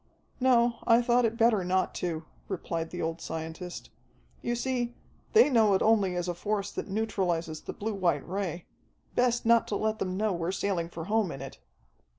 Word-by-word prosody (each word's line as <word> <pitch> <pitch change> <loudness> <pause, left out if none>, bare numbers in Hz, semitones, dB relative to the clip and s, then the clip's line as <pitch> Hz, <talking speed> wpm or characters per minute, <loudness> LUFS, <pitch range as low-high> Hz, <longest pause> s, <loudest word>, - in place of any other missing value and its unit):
"No, 240 -2 +4
I 230 0 +7
thought 245 0 +3
it 230 0 -1
better 225 -4 +4
not 185 +1 +1
to," 165 -3 -3 0.2
replied 165 -3 -3
the 175 - -4
old 165 0 -3
scientist. 160 +2 -6 0.5
"You 240 - -1
see, 240 -1 -1 0.4
they 445 - +7
know 220 -7 +4
it - - +2
only 205 -5 +3
as 175 0 -2
a 175 - -1
force 200 +3 -2
that - - -5
neutralizes 180 -6 -1
the - - -6
blue 220 +1 -3
white 185 -3 0
ray. 180 -2 -3 0.5
Best 245 -1 +2
not 230 0 +5
to 205 - -2
let 220 +1 -1
them 185 0 -2
know 215 -1 +1
we're 170 0 -2
sailing 190 -4 -1
for 165 -1 -6
home 210 -2 +1
in 135 - -7
it." 135 0 -8
200 Hz, 185 wpm, -29 LUFS, 175-230 Hz, 0.5 s, I